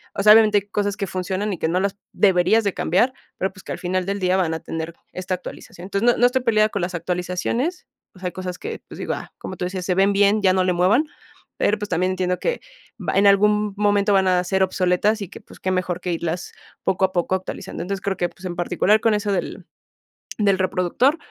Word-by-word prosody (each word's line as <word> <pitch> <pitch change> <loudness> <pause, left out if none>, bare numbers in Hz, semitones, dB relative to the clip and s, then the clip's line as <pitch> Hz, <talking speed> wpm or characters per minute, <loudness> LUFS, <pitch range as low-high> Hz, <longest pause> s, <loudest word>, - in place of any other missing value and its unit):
O - - -1
sea, 210 0 +9
obviamente 215 -2 +6
hay 200 +1 -17
cosas 205 -1 -1
que 195 - -2
funcionan 190 +3 -2
y 180 - -4
que - - 0
no 180 +2 +1
las 200 +1 -1 0.2
deberías 195 +3 +3
de 200 -2 0
cambiar, 215 +10 +2 0.3
pero, 190 - 0
pues, 190 - -15
que - - -8
al - - -7
final 185 0 -1
del 200 +1 -2
día 185 0 +2
van 170 -4 +1
a 160 - -3
tener 165 +1 -5 0.2
esta 185 0 -3
actualización. 180 0 -10
Entonces, 200 +4 -1
no - - -2
no 245 - +4
estoy 250 0 -1
peleada 215 -2 +3
con 200 - -3
las 180 0 -3
actualizaciones, 180 - -2 0.3
o 185 - -15
sea, 185 - -3
hay 180 - -3
cosas 185 -1 -5
que, - - -5
pues, - - -11
digo, - - -2
ah, - - -9
como 185 - -7
tú - - -2
decías, 185 0 -4
se 180 - 0
ven 195 +1 +3
bien, 205 +1 +3
ya 185 - +5
no 185 0 +2
le 185 -1 +1
muevan, 195 - +3 0.5
pero, 210 - +2
pues, 210 - -5
también 180 +2 +1
entiendo 180 -1 -1
que - - -1 0.4
va - - -2
en 200 - +4
algún 210 +1 +3
momento 205 0 +2
van 190 -1 +3
a 180 -1 +3
ser 190 +1 0
obsoletas 190 +3 +1
y 185 - -8
que, - - -11
pues, - - -16
qué 185 - -1
mejor 180 -1 -1
que 180 -1 -2
irlas 170 +1 -3 0.3
poco 190 0 +2
a 185 - -3
poco 175 +1 0
actualizando. 185 -2 -6
Entonces, 195 +1 -4
creo 195 -2 -1
que, 175 - 0
pues, 190 - -14
en 175 -1 -4
particular 185 +5 +2
con 225 - +3
eso 210 -1 -1
del 190 - -3 0.7
del 200 -3 +2
reproductor, 190 - +1
190 Hz, 245 wpm, -22 LUFS, 180-205 Hz, 0.7 s, sea